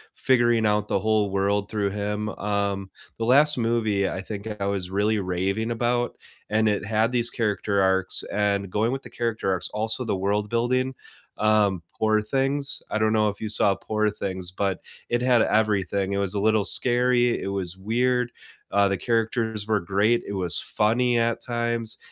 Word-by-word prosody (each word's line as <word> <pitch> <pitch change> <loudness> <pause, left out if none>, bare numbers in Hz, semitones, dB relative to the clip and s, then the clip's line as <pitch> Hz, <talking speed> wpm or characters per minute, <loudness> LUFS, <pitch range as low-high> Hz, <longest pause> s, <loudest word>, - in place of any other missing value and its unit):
figuring 120 -3 +2
out 105 0 +1
the 100 - +1
whole 110 0 +1
world 100 +1 0
through 100 -2 -1
him. 105 +1 -3
Um, 100 -1 -2 0.3
the 115 - -2
last 145 +5 +4
movie, 110 -4 +1
I - - -4
think 105 +2 -7
I - - 0
was 100 -2 -2
really 105 +2 +1
raving 95 +4 -1
about, 120 +1 -1 0.3
and 110 +1 +2
it 105 -1 0
had 110 +2 +1
these 120 -1 +1
character 105 -3 0
arcs, 95 -1 +2
and 100 -2 0
going 110 +4 0
with 135 +1 -4
the - - -11
character 115 -5 -2
arcs, 90 -1 -1
also 110 +3 -2
the 105 -4 -1
world 105 +2 -1
building, 130 +3 0 0.4
um, 105 -4 +2
Poor 110 -1 +2
Things, 135 +4 -1
I - - -1
don't 110 0 +2
know 110 -1 +3
if 105 - -7
you 110 - -4
saw 100 -2 +3
Poor 110 +1 -1
Things, 95 -3 -4
but 95 0 -2 0.3
it 120 0 0
had 125 -2 +4
everything. 100 -3 +1
It - - -1
was 100 -1 -1
a 100 - -1
little 110 0 +2
scary, 120 -1 +3
it - - -4
was 95 -2 -3
weird, 125 +4 0 0.4
uh, 100 0 +4
the 100 - 0
characters 115 -2 -1
were 110 -1 +2
great, 100 +6 +1
it 100 - -4
was 90 -3 +1
funny 120 +3 +1
at 115 0 0
times, 120 -2 -2
105 Hz, 180 wpm, -24 LUFS, 100-115 Hz, 0.4 s, last